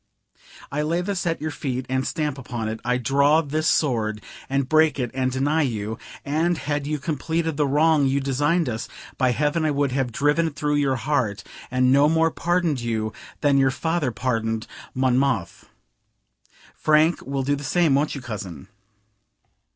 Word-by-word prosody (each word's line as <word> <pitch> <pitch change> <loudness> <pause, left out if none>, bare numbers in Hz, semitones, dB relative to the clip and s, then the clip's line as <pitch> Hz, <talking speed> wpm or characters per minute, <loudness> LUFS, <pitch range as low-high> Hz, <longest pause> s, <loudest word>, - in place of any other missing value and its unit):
I 145 +1 -1
lay 165 +3 0
this 185 -1 -2
at 165 - 0
your 155 +1 -2
feet 130 -3 -3
and 130 0 -1
stamp 150 -3 -2
upon 120 -4 -4
it: 110 +1 -4
I 125 +1 +1
draw 140 +5 +3
this 155 +2 -1
sword, 110 -7 +1 0.3
and 135 -1 0
break 155 +1 +4
it 125 -4 -2
and 130 -1 0
deny 145 +5 +1
you; 110 -5 -2 0.3
and, 160 +4 +1
had 145 -1 -2
you 150 0 -1
completed 160 +3 -2
the 145 -1 +1
wrong 150 0 +3
you 135 +1 +1
designed 145 +5 +1
us, 110 -2 -3 0.3
by 130 -2 +3
heaven 150 +5 0
I 155 - +2
would 140 -2 0
have 130 -2 -1
driven 145 +7 +2
it 150 - -6
through 150 -1 0
your 140 -2 +2
heart, 120 -6 -1 0.3
and 130 0 +2
no 140 +2 +5
more 165 0 +3
pardoned 170 -5 0
you 110 -2 -2 0.3
than 140 -1 +4
your 135 0 +4
father 160 +1 -1
pardoned 115 -2 -2 0.3
Monmouth. 130 -6 0 1.0
Frank 155 +2 +2
will 135 0 -2
do 145 +2 +1
the 145 - -7
same, 160 +1 +2
won't 145 +3 +1
you, 140 - -6
cousin?" 100 - -7
140 Hz, 175 wpm, -23 LUFS, 130-155 Hz, 1.0 s, no